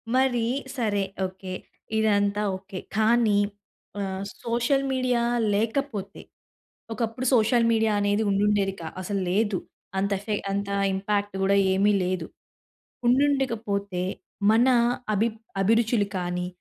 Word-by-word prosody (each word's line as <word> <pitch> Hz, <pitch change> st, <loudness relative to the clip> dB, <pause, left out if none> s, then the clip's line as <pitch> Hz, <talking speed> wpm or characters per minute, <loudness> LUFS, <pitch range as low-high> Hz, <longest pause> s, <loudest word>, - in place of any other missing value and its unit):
మరి 255 Hz, -3 st, +2 dB, 0.3 s
సరే 210 Hz, -4 st, +1 dB, 0.2 s
ఓకే. 185 Hz, 0 st, -8 dB, 0.4 s
ఇదంతా 205 Hz, -1 st, +2 dB, 0.2 s
ఓకే. 190 Hz, -1 st, -8 dB, 0.2 s
కానీ 220 Hz, -1 st, +4 dB, 0.6 s
ఆహ్, 190 Hz, 0 st, -3 dB, 0.2 s
సోషల్ 240 Hz, +4 st, +1 dB
మీడియా 255 Hz, -2 st, +1 dB, 0.3 s
లేకపోతే, 220 Hz, -1 st, -2 dB, 0.7 s
ఒకప్పుడు 230 Hz, +3 st, -2 dB
సోషల్ 230 Hz, +1 st, +4 dB
మీడియా 220 Hz, -1 st, +2 dB
అనేది 205 Hz, +2 st, +1 dB
ఉండుండేది 200 Hz, -1 st, +2 dB
కా 160 Hz, -, -5 dB
అసలు 200 Hz, +1 st, -2 dB
లేదు. 205 Hz, -1 st, +1 dB, 0.4 s
అంత 200 Hz, +1 st, 0 dB
ఎఫె 210 Hz, +1 st, -3 dB, 0.2 s
అంత 200 Hz, 0 st, -2 dB, 0.3 s
ఇంపాక్ట్ 200 Hz, +1 st, -1 dB
కూడా 200 Hz, +1 st, +3 dB, 0.2 s
ఏమీ 200 Hz, +2 st, +3 dB
లేదు, 180 Hz, -3 st, -2 dB, 0.8 s
ఉండుండక 270 Hz, 0 st, +3 dB
పోతే 200 Hz, -3 st, -2 dB, 0.5 s
మన 235 Hz, +4 st, +4 dB, 0.5 s
అభి 220 Hz, +3 st, +2 dB, 0.3 s
అభిరుచులు 225 Hz, 0 st, +2 dB
కానీ, 180 Hz, 0 st, -2 dB
210 Hz, 110 wpm, -26 LUFS, 195-235 Hz, 0.8 s, కానీ